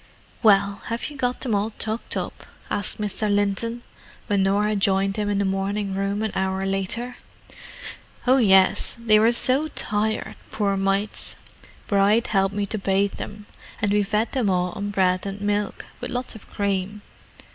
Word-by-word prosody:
"Well—have 200 +4 +2
you - - -10
got 250 -2 -1
them 245 -5 -1
all 210 +2 0
tucked 220 +1 -2
up?" - - -5 0.2
asked 205 - -1
Mr. 210 0 -1
Linton, 205 +4 0 0.4
when 200 -1 +1
Norah 205 +2 +2
joined 195 0 +2
him 210 -1 -1
in 205 - 0
the 200 - +1
morning 195 +1 -1
room 195 +2 -1
an 220 - -1
hour 190 0 -1
later. 195 +6 -2 1.1
"Oh, 260 +1 +5
yes; 195 -3 +4
they 215 -2 +4
were 225 +2 +5
so 260 +5 +2
tired, 215 -6 -1
poor 200 -2 0
mites. 195 +2 0 0.5
Bride 205 +4 +3
helped 195 -3 +1
me 205 -1 0
to 215 +2 0
bathe 195 +1 +1
them, 210 0 -7 0.3
and 205 -1 +1
we 210 - +4
fed 215 +2 0
them 250 -7 +1
all 180 -1 +1
on 205 +2 -4
bread 185 -1 +1
and 195 +1 -5
milk—with 205 0 -3
lots 250 +1 -3
of 220 - -13
cream. 200 0 -2
205 Hz, 160 wpm, -24 LUFS, 195-220 Hz, 1.1 s, Oh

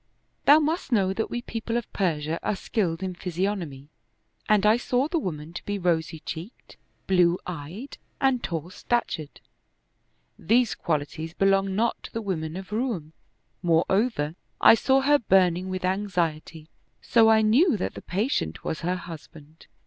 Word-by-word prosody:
Thou 290 - +8
must 315 0 -1
know 195 -5 +2
that 220 +3 -2
we 240 0 -4
people 230 0 -3
of 240 - -5
Persia 160 -4 -1
are 210 - -1
skilled 190 -4 -2
in 185 -1 -3
physiognomy, 175 -6 -3 0.6
and 210 -1 +4
I 215 +1 +6
saw 250 +3 0
the 335 +1 0
woman 160 - -5
to - - -7
be 205 0 -3
rosy 165 -3 -1
cheeked, 170 +8 -8 0.3
blue 180 -2 +3
eyed, 180 - -7 0.2
and 265 -3 +2
tall 170 +1 -4
stat 240 +5 -1
ured. 155 -2 -5 1.1
These 230 +5 +2
qualities 160 +1 -3
belong 195 0 +2
not 230 +3 0
to - - -10
the 230 - -3
women 165 -4 -3
of 190 +1 -9
Roum; 210 - -2 0.5
moreover, 175 0 +1 0.3
I - - +8
saw 265 +4 +3
her 290 +2 +4
burning 185 -4 +2
with 185 0 -3
anxiety; 170 -5 -2 0.4
so 225 -2 +5
I 220 0 +5
knew 250 - +4
that - - -3
the - - -9
patient 190 - -2
was 160 - -3
her 180 +2 -1
husband. 160 -3 -11
190 Hz, 155 wpm, -26 LUFS, 165-225 Hz, 1.1 s, Thou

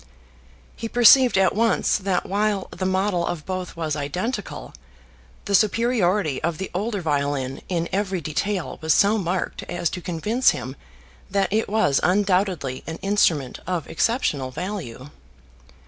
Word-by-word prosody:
He 225 - -5
perceived 245 0 +6
at 190 -1 +3
once 225 -1 +2
that 190 -2 -1
while 205 0 0
the 185 +1 -3
model 190 -1 +1
of 170 -3 -4
both 185 -1 -4
was 160 -2 -2
identical, 180 - -4 0.7
the 200 - -3
superiority 210 - +2
of 170 -1 -1
the 190 - -5
older 205 +2 -2
violin 140 -4 -1
in 170 -2 -1
every 195 -1 -1
detail 170 +5 -3
was 160 0 +3
so 210 +2 +4
marked 180 0 -2
as 175 -2 -1
to 180 - -5
convince 210 +10 +1
him 130 +1 -6 0.5
that 195 -1 0
it 220 -1 +1
was 200 -10 +2
undoubtedly 180 -7 +1
an 160 0 -5
instrument 165 -10 +1
of 180 -4 -2
exceptional 155 - 0
value. 145 - -6
185 Hz, 140 wpm, -23 LUFS, 160-205 Hz, 0.7 s, perceived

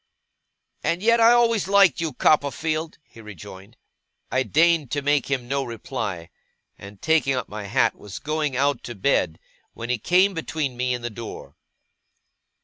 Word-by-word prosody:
'And 170 +3 -1
yet 230 +1 +4
I 230 +1 +7
always 230 -4 +2
liked 195 -6 +4
you, 165 -2 -1
Copperfield!' 155 +2 0
he 115 - -16
rejoined. 100 +1 -12 0.5
I 130 - +2
deigned 160 0 +2
to 145 +2 -2
make 145 -2 +1
him 130 -3 -2
no 140 +1 -1
reply; 110 -8 -5 0.4
and, 100 0 -12
taking 150 -2 +2
up 125 - -3
my 105 -1 -6
hat, 115 +2 +2
was 100 -2 -10
going 150 -3 -2
out 140 -1 +1
to 120 - -7
bed, 95 - +1 0.4
when 120 +1 -4
he 125 - -1
came 185 - +3
between 155 -5 -3
me 125 0 -1
and 120 - -8
the 120 - -4
door. 115 +1 -9
135 Hz, 160 wpm, -23 LUFS, 115-160 Hz, 0.5 s, I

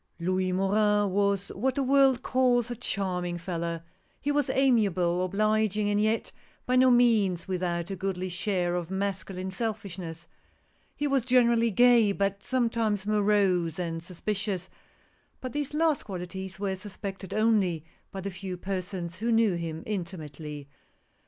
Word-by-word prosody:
L 170 +2 -2
OUIS 185 0 +1
MORIN 205 +1 +2
was 200 0 +1
what 255 +6 -1
the 275 - +1
world 270 -1 +4
calls 245 -2 +2
a - - -2
charm 195 -6 -2
ing 175 -1 -3
fellow. 170 -1 -3 0.4
He 290 - -1
was 290 -2 +1
amiable, 195 -9 +2
obliging, 215 +1 +1
and 205 0 +2
yet 220 +1 0 0.3
by 250 - +1
no 255 0 +6
means 220 -8 +3
without 175 -1 -2
a - - -2
goodly 185 -1 -3
share 180 -1 -1
of 175 -1 -3
masculine 190 -1 -3
selfishness. 190 -6 -5 0.7
He 295 - -2
was 275 -2 +2
generally 235 -1 +3
gay, 230 -1 +5
but 200 0 -1
sometimes 230 -5 0
morose 200 -5 +2
and 165 -2 -3
sus 175 0 -12
picious; 200 -3 -2 0.7
but 255 -2 -6
these 290 -1 -2
last 310 -2 +2
qualities 190 0 -6
were 195 -1 -1
suspected 195 -1 -7
only 205 -8 +2 0.3
by 195 - -5
the 200 +1 -4
few 185 0 -6
persons 185 -1 -4
who 230 +4 -1
knew 225 -3 +4
him 165 -2 -4
intimately. 155 -7 -6
195 Hz, 150 wpm, -28 LUFS, 180-225 Hz, 0.7 s, no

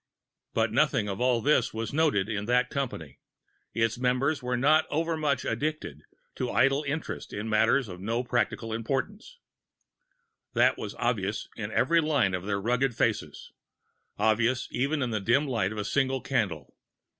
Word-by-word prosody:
But - - +2
nothing 105 - +2
of 100 +2 -4
all 125 -2 +2
this 130 -5 +2
was 115 +1 -4
noted 145 -11 +2
in 105 -2 -3
that 125 +2 +2
company; 120 - -4 0.5
its 115 0 0
members 130 +4 +1
were 125 0 -1
not 155 +5 +4
overmuch 155 -3 0
addicted 150 - -3 0.4
to 125 - -2
idle 135 +3 +3
interest 150 +3 -4
in 105 +2 -4
matters 110 +4 +3
of 90 -2 -9
no 115 +5 -1
practical 120 -2 -1
importance; 140 - -3 1.2
that - - +4
was - - -6
obvious - - -1
in - - -5
every 170 0 +3
line 145 -11 +1
of 90 0 -3
their 100 -1 0
rugged 125 +4 0
faces 105 -11 -2 0.7
obvious 115 +3 +2
even 140 +3 0
in 120 - -2
the 110 - 0
dim 125 +8 +2
light 115 -7 0
of 110 - -6
the 105 - -3
single 135 +2 +1
candle. 100 - -2
125 Hz, 155 wpm, -28 LUFS, 110-140 Hz, 1.2 s, not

